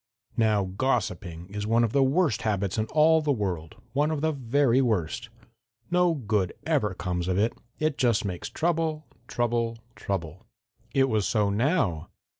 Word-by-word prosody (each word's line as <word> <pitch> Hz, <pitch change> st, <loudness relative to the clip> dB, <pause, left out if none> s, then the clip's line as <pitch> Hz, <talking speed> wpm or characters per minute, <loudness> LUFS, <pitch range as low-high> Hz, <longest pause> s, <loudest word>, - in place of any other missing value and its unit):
"Now, 110 Hz, -3 st, +3 dB
gossiping 95 Hz, -5 st, -2 dB
is 105 Hz, +1 st, -4 dB
one 115 Hz, +2 st, +3 dB
of 115 Hz, -, +1 dB
the 140 Hz, -, +3 dB
worst 140 Hz, -, +2 dB
habits 100 Hz, -2 st, -1 dB
in 110 Hz, -, 0 dB
all 155 Hz, +4 st, +4 dB
the 150 Hz, -1 st, +1 dB
world, 95 Hz, -, -2 dB, 0.2 s
one 145 Hz, +3 st, +2 dB
of 155 Hz, -2 st, -2 dB
the 160 Hz, 0 st, +2 dB
very 135 Hz, -1 st, +2 dB
worst. 115 Hz, -1 st, -1 dB, 0.6 s
No 180 Hz, -1 st, +3 dB
good 105 Hz, -, 0 dB
ever 135 Hz, -, +1 dB
comes 90 Hz, -1 st, -2 dB
of 95 Hz, 0 st, 0 dB
it. 110 Hz, +3 st, +2 dB, 0.2 s
It 155 Hz, -2 st, -1 dB
just 115 Hz, -5 st, +2 dB
makes 90 Hz, -3 st, -4 dB
trouble, 160 Hz, -2 st, -1 dB, 0.2 s
trouble, 120 Hz, -1 st, -1 dB, 0.2 s
trouble. 90 Hz, -2 st, -4 dB, 0.4 s
It 135 Hz, +1 st, +3 dB
was 110 Hz, -5 st, +1 dB
so 105 Hz, -3 st, +1 dB
now. 105 Hz, -, 0 dB
115 Hz, 160 wpm, -27 LUFS, 100-140 Hz, 0.6 s, all